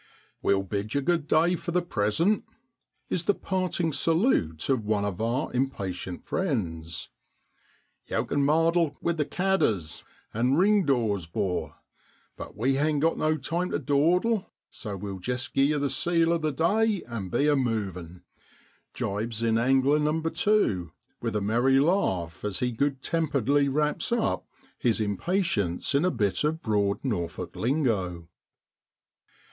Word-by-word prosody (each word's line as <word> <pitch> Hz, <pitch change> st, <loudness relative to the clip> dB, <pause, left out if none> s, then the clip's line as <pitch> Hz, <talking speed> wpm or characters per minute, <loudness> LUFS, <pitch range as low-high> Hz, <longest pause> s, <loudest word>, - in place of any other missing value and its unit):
* -, -, -38 dB
We'll 100 Hz, 0 st, +2 dB
bid 100 Hz, +3 st, -4 dB
you 140 Hz, -, +2 dB
good 165 Hz, 0 st, 0 dB
day 165 Hz, +3 st, +3 dB
for 175 Hz, -, -6 dB
the 180 Hz, 0 st, +1 dB
present,' 165 Hz, -, +1 dB, 0.7 s
is 175 Hz, -2 st, -1 dB
the 205 Hz, -, +3 dB
parting 185 Hz, -3 st, -1 dB
salute 160 Hz, -, +1 dB
of 130 Hz, -5 st, +1 dB
one 105 Hz, -1 st, 0 dB
of 100 Hz, 0 st, -3 dB
our 120 Hz, +6 st, -1 dB
impatient 95 Hz, -9 st, -3 dB
friends: 85 Hz, -, -3 dB, 0.5 s
' -, -, -39 dB
Yow -, -, 0 dB
kin 145 Hz, 0 st, 0 dB
mardle 165 Hz, +3 st, +3 dB
(gossip) -, -, -29 dB
wi' 170 Hz, -, +2 dB
the 155 Hz, -3 st, -1 dB
cadders 140 Hz, -, 0 dB
(jackdaws) -, -, -21 dB, 0.3 s
and 125 Hz, +5 st, +2 dB
ring 200 Hz, +1 st, +4 dB
dows, 110 Hz, -, +1 dB
'bor; 95 Hz, 0 st, -2 dB, 0.6 s
but -, -, -9 dB
we 135 Hz, +5 st, +1 dB
hain't 150 Hz, 0 st, +1 dB
got 165 Hz, -, +3 dB
no 155 Hz, 0 st, +1 dB
time 175 Hz, +5 st, -2 dB
to -, -, 0 dB
dawdle, 170 Hz, -, +2 dB, 0.2 s
so 105 Hz, -5 st, -6 dB
we'll 95 Hz, 0 st, -6 dB
jist 125 Hz, +7 st, -3 dB
gie 135 Hz, 0 st, +4 dB
ye 150 Hz, 0 st, +1 dB
the 140 Hz, 0 st, 0 dB
seal 165 Hz, +5 st, +2 dB
o' 170 Hz, -, +1 dB
the 155 Hz, -1 st, 0 dB
day 200 Hz, +8 st, +1 dB
and 115 Hz, -6 st, -6 dB
be 145 Hz, +10 st, +1 dB
a 150 Hz, -, +4 dB
moving,' 95 Hz, -, -3 dB, 0.7 s
jibes 110 Hz, +3 st, -2 dB
in 115 Hz, 0 st, +2 dB
angler 135 Hz, +4 st, +3 dB
number 160 Hz, +2 st, 0 dB
two 205 Hz, -, +1 dB, 0.3 s
with 115 Hz, -2 st, -2 dB
a 105 Hz, -, +1 dB
merry 120 Hz, +6 st, +3 dB
laugh 95 Hz, -, 0 dB
as 105 Hz, -3 st, -2 dB
he 125 Hz, -, 0 dB
good 135 Hz, +3 st, -1 dB
temperedly 145 Hz, -3 st, +1 dB
wraps 150 Hz, -, 0 dB
up 235 Hz, -2 st, 0 dB, 0.3 s
his 115 Hz, -2 st, +1 dB
impatience 105 Hz, -, 0 dB
in 140 Hz, +3 st, +3 dB
a 185 Hz, -, +3 dB
bit 105 Hz, -, 0 dB
of 160 Hz, +2 st, -1 dB
Broad 100 Hz, -2 st, +1 dB
Norfolk 90 Hz, -, -3 dB
lingo. 105 Hz, -, -1 dB
135 Hz, 160 wpm, -27 LUFS, 105-165 Hz, 0.7 s, ring